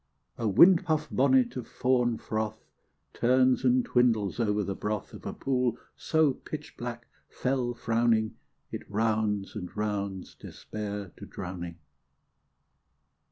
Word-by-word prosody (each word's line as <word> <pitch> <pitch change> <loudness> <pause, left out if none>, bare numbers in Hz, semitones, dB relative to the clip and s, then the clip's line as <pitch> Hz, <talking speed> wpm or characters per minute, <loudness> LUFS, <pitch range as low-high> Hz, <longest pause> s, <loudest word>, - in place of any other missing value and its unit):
A 115 - 0
windpuff 165 - +5
bonnet 130 -1 +3
of 125 - -5
fawn 125 -2 +1
fr6th 110 0 -3 0.6
Turns 130 +1 +3
and 125 0 +3
twindles 115 -4 +2
over 105 -2 +1
the 100 - -2
broth 105 +1 -4
Of - - -8
a - - -3
pool 125 -3 0 0.2
so 160 -3 +2
pitchblack, - - -7 0.3
fe"ll 125 -2 -1
fr6wning, 115 -1 +2 0.4
It - - -4
rounds 105 -2 0
and 90 - -5
rounds 100 -3 -3
Despair 105 -2 -6
to - - -9
drowning. 85 -2 -6
115 Hz, 115 wpm, -29 LUFS, 105-125 Hz, 0.6 s, windpuff